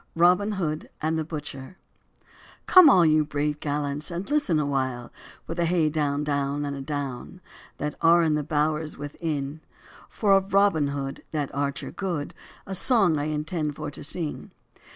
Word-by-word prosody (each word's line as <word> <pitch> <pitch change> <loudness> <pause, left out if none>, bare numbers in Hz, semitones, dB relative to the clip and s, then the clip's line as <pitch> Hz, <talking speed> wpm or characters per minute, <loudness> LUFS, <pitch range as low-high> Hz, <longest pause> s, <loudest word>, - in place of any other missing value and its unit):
ROBIN 180 +5 +4
HOOD 155 -5 -3
AND 160 +1 0
THE - - -1
BUTCHER 150 0 -7 0.9
COME, 365 -5 +8
all 180 -9 +6
you 155 -1 +4
brave 150 0 -2
gallants, 145 +1 -2
and 175 +2 -5
listen 290 - +2
awhile, 130 -4 -2 0.3
With 165 +1 -5
hey 170 -2 +2
down, 145 -1 0
down, 145 0 -1
an 140 - -3
a 140 - -6
down, 140 +3 -5 0.4
That 150 0 -3
are 170 +1 +5
in 160 -2 +2
the 150 - +1
bowers 155 +1 -1
within; 145 0 -4 0.5
For 200 -3 +3
of 195 +1 0
Robin 195 -7 +4
Hood, 140 -1 -4
that 145 -3 -2
archer 140 0 -3
good, 175 -7 -3 0.3
A 195 - -5
song 190 - +3
I 145 - -1
intend 150 0 -2
for 150 -1 -5
to - - -8
sing. 155 +1 -4
150 Hz, 160 wpm, -25 LUFS, 145-170 Hz, 0.9 s, COME